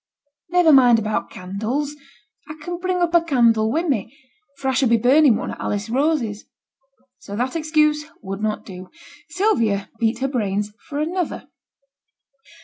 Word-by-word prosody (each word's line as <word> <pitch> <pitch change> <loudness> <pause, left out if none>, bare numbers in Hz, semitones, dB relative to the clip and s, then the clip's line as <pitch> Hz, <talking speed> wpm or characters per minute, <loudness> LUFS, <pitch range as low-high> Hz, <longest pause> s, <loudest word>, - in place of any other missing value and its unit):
'Niver 350 -3 +5
mind 245 -4 +7
about 215 -1 -2
candles. 220 +11 -4 0.5
I 305 - -6
can 350 +2 -5
bring 370 0 -1
up 345 -1 0
a 340 - +6
candle 230 -8 +2
wi' 325 +6 0
me, 265 - -2 0.4
for 275 - -4
I 265 - +2
should 260 -1 +2
be 235 - +4
burning 260 +2 +5
one - - -4
at - - -9
Alice 205 +2 -3
Rose's.' 260 -6 0 0.7
So 200 - -8
that 250 +7 -2
excuse 305 -1 +1
would 195 0 -6
not 215 0 -2
do. 185 -2 -10 0.4
Sylvia 230 - 0
beat 230 0 +1
her 265 +2 -1
brains 210 -5 -2
for 285 - -5
another. 335 +3 -3
255 Hz, 155 wpm, -21 LUFS, 215-310 Hz, 0.7 s, mind